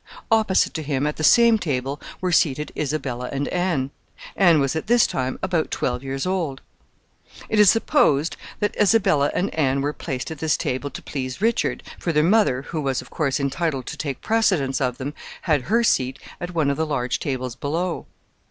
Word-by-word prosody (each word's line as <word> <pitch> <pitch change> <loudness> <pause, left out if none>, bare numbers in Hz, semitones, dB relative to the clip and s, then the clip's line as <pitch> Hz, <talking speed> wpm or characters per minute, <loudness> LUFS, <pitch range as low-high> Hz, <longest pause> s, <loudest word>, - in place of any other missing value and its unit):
Opposite 220 -4 +3
to 160 - -3
him, 140 -2 -1
at 150 - -2
the 155 - -4
same 230 +5 +6
table, 140 -4 -2 0.2
were 185 -1 0
seated 150 -3 +2
Isabella 135 -4 -3
and 140 +1 -2
Anne. 175 -7 -1 0.4
Anne 175 -5 +5
was 135 +1 0
at 160 - -3
this 240 0 +5
time 130 0 -2
about 180 -4 0
twelve 125 -1 -2
years 135 +2 -3
old. 170 -8 -1 0.8
Now - - -13
it 215 - +1
is 210 -2 +8
supposed 175 - +3 0.3
that 210 - 0
Isabella 190 -9 +4
and 190 - -1
Anne 140 -3 +1
were 145 +2 -1
placed 135 -2 -5
at 160 - -7
this 155 0 +1
table 130 +3 -2
to - - -9
please 130 -1 -5
Richard, 225 +3 0 0.2
for 170 - -1
their 150 -1 +3
mother, 175 - +3
who 155 +1 -4
was, 135 -3 -1
of - - -18
course, 150 -2 0
entitled 140 -1 -1
to - - -6
take 140 -4 -4
precedence 185 -13 +1
of 125 -2 0
them, 140 +2 -5 0.3
had 150 -7 +1
her 230 +2 +3
seat 130 - +1 0.2
at 175 0 -6
one 150 -4 +2
of 140 - -3
the 160 0 0
large 125 -5 -1
tables 130 -3 -3
below. 165 +7 -3
150 Hz, 195 wpm, -23 LUFS, 135-180 Hz, 0.8 s, is